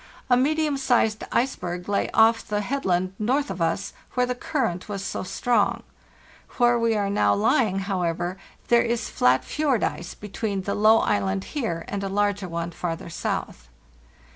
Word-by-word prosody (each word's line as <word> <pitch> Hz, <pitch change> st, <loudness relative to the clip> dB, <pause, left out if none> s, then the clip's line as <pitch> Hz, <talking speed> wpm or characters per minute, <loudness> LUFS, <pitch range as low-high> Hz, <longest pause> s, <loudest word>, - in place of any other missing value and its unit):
A -, -, +8 dB
medium 300 Hz, +3 st, +1 dB
sized 240 Hz, -5 st, +1 dB
iceberg 180 Hz, -9 st, -1 dB
lay 200 Hz, 0 st, 0 dB
off 225 Hz, +1 st, +4 dB
the 210 Hz, 0 st, -1 dB
headland 190 Hz, -7 st, -1 dB
north 255 Hz, +3 st, 0 dB
of 185 Hz, -2 st, -6 dB
us, 165 Hz, 0 st, -1 dB, 0.2 s
where 250 Hz, -1 st, +3 dB
the 250 Hz, -, -1 dB
current 235 Hz, -, -2 dB
was 195 Hz, -1 st, -4 dB
so -, -, -3 dB
strong, 215 Hz, +2 st, 0 dB, 0.7 s
Where 240 Hz, -1 st, +4 dB
we 230 Hz, -1 st, +2 dB
are 205 Hz, -1 st, 0 dB
now 105 Hz, -, +2 dB
lying, 195 Hz, -, +2 dB
however, 180 Hz, -2 st, -2 dB, 0.3 s
there 235 Hz, 0 st, +6 dB
is 235 Hz, -1 st, -2 dB
flat 125 Hz, +1 st, +3 dB
fjord 285 Hz, -7 st, 0 dB
ice 175 Hz, -, -3 dB
between 205 Hz, -1 st, -4 dB
the 200 Hz, -, -2 dB
low 215 Hz, +2 st, +5 dB
island 95 Hz, -1 st, 0 dB
here 195 Hz, -, -2 dB
and 200 Hz, -1 st, -3 dB
a 195 Hz, -, -2 dB
larger 205 Hz, -1 st, 0 dB
one 170 Hz, 0 st, -3 dB
farther 170 Hz, -1 st, -5 dB
south. 60 Hz, -, -4 dB
205 Hz, 165 wpm, -24 LUFS, 175-240 Hz, 0.7 s, A